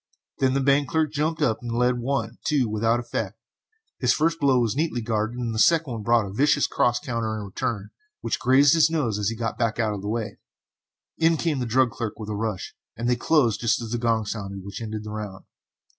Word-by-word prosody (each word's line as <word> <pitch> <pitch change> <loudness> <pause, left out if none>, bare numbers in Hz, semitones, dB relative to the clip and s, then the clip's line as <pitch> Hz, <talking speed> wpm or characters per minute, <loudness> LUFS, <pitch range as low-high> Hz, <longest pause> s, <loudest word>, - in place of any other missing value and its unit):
Then 130 -1 +2
the 140 - +2
bank 140 0 +3
clerk 160 -2 +1
jumped 155 +2 -1
in 110 - +3
and 120 -1 -4
led 125 0 +2
one, 135 +3 -2
two, 140 -5 +2
without 115 +2 +1
effect, 110 -3 -4 0.6
for - - -16
his 120 - +5
first 165 +2 +1
blow 140 -4 +3
was 115 -1 0
neatly 155 -4 0
guarded 110 +1 -1
and 120 -2 -2
the 110 - -2
second 150 -7 +3
brought 115 0 +3
a 95 - -7
vicious 145 +5 +3
cross 120 0 +1
counter 115 -3 -3
in 105 - -5
return, 100 +1 -4 0.3
which - - -2
grazed 135 +3 +5
his 160 -1 +5
nose 130 -11 -1
as 105 0 +1
he 115 - -4
got 115 0 -3
back 115 -2 0
out 110 -2 +1
of 100 - -5
the 100 - -4
way. 110 -1 -3 0.8
In 165 0 +4
came 155 -3 0
the 125 - -2
drug 125 +1 +3
clerk 115 -3 -5
with 110 -1 -7
a 105 - -2
rush, 105 -3 -3 0.2
and 120 +2 -2
they 125 - +3
closed 120 -5 +2
just 115 -1 +2
as 115 -2 -6
the 120 - -1
gong 115 -2 +1
sounded 100 -2 -5
which 100 +3 -7
ended 110 -1 -5
the 105 - -7
round. 105 -3 -6
120 Hz, 230 wpm, -25 LUFS, 110-135 Hz, 0.8 s, his